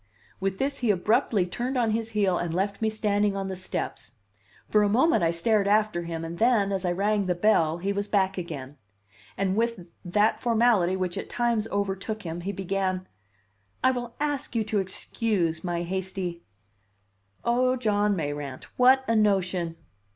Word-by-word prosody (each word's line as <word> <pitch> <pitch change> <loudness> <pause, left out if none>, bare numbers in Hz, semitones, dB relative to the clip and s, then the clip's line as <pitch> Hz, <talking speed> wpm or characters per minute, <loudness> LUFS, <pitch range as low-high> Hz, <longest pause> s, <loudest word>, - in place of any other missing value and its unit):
With 195 0 -1
this 275 +3 -1
he 240 - 0
abruptly 210 +1 +2
turned 245 +8 -3
on 230 -3 +2
his 225 +1 -1
heel 190 -4 +2
and 170 -1 -2
left 200 +3 -1
me 220 - +2
standing 210 -2 +1
on 195 -1 -3
the 190 - -3
steps. 185 -9 -5 0.5
For 210 - +3
a 205 - +3
moment 260 - +3
I 165 - +3
stared 200 +5 +2
after 210 -4 +2
him; 165 -1 -4
and 170 +1 -7
then, 225 -4 +3
as 190 -1 -1
I 175 - +1
rang 200 +2 +1
the 180 - +1
bell, 170 -4 +3
he 195 +3 -1
was 200 +1 -2
back 195 -2 +1
again; 150 -6 -6 0.6
and 190 -1 0
with 230 -5 -1 0.2
that 205 +4 +2
formality 225 -6 +3
which 185 -2 -2
at - - -7
times 235 -3 0
overtook 200 +1 -3
him 170 0 -5
he 195 +3 -3
began: 190 -1 -2 0.8
"I 260 - +5
will 240 -2 -5
ask 290 -3 -2
you 225 - +2
to 215 -1 0
excuse 190 -3 -1
my 175 -1 -2
hasty 185 -1 -4 0.5
" 100 0 -42
"Oh, 255 +2 +3
John 210 -4 +1
Mayrant! 145 -5 -4
What 260 +1 +5
a 230 - +2
notion!" 185 -5 +1
200 Hz, 175 wpm, -26 LUFS, 175-220 Hz, 0.8 s, I